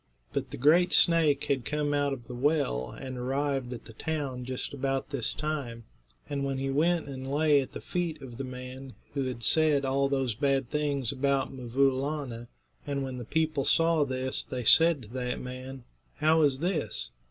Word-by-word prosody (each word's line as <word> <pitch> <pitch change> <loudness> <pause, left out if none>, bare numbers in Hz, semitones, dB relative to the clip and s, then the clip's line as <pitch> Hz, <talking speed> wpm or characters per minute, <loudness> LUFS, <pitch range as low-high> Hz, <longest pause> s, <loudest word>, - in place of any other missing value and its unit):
But - - -2
the - - -7
great 170 +7 +4
snake 160 -5 +5
had 135 -3 0
come 150 +1 -1
out 145 -1 +1
of 125 -4 -5
the 125 - -8
well 120 - 0
and 130 - -7
arrived 135 0 -1
at 120 -2 -7
the 115 - -12
town 140 -3 -3
just 130 +2 -4
about 135 0 -2
this 135 -5 -2
time, 140 -7 -4 0.4
and 140 -1 -2 0.2
he 135 0 -1
went 165 +3 +1
and 135 -1 -6
lay 150 -1 +4
at 130 - -8
the - - -6
feet 175 -3 -3
of 125 -2 -10
the - - -2
man 130 +1 -8 0.2
who 135 -2 -1
had 125 -2 -5
said 150 +2 +4
all 135 +1 +1
those 135 -4 0
bad 135 +1 0
things 145 -5 0
about 140 0 0
'Mvoo 130 +2 +2
Laana, 130 -3 -4 0.4
and 140 -1 -1
when 130 -1 -5
the 120 - -6
people 155 +1 0
saw 165 +2 +4
this 130 -1 -1
they 125 -1 -5
said 160 +2 +6
to - - -11
that 125 0 -3
man: 130 +1 -7 0.3
"How 160 +1 +3
is 140 -3 +3
this? 155 - -2
135 Hz, 185 wpm, -29 LUFS, 130-150 Hz, 0.4 s, said